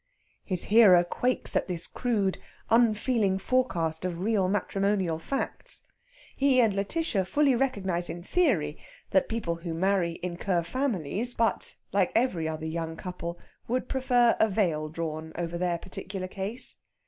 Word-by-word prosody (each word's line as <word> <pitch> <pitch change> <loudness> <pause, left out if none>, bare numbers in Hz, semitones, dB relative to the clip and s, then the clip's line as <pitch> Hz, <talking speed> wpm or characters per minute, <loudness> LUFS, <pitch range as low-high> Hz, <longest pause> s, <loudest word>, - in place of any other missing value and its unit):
His 185 -3 +2
hearer 200 -5 +7
quakes 250 +8 -1
at - - +1
this 175 -2 0
crude, 210 -6 -1 0.3
unfeeling 225 -3 +3
forecast 180 -8 0
of 180 -2 -2
real 195 -1 +1
matrimonial 195 -3 0
facts. 275 - -4 0.5
He 270 -2 +3
and 225 -4 +4
Lætitia 200 - -1
fully 290 +4 +3
recognise 190 -9 -1
in 175 0 -6
theory 185 - +1 0.3
that 190 - +3
people 195 -7 -2
who 170 -1 -5
marry 180 -1 +1
incur 180 0 -1
families; 230 - -2
but, 230 0 0 0.2
like 195 -2 +2
every 190 -10 +1
other 160 0 -4
young 165 0 -4
couple, 175 -2 -6 0.3
would 250 +2 -1
prefer 245 -3 +3
a 220 - +4
veil 165 -7 0
drawn 160 0 -5
over 170 0 -3
their 175 -1 0
particular 185 +1 -6
case. 200 +7 -4
190 Hz, 140 wpm, -28 LUFS, 170-230 Hz, 0.5 s, hearer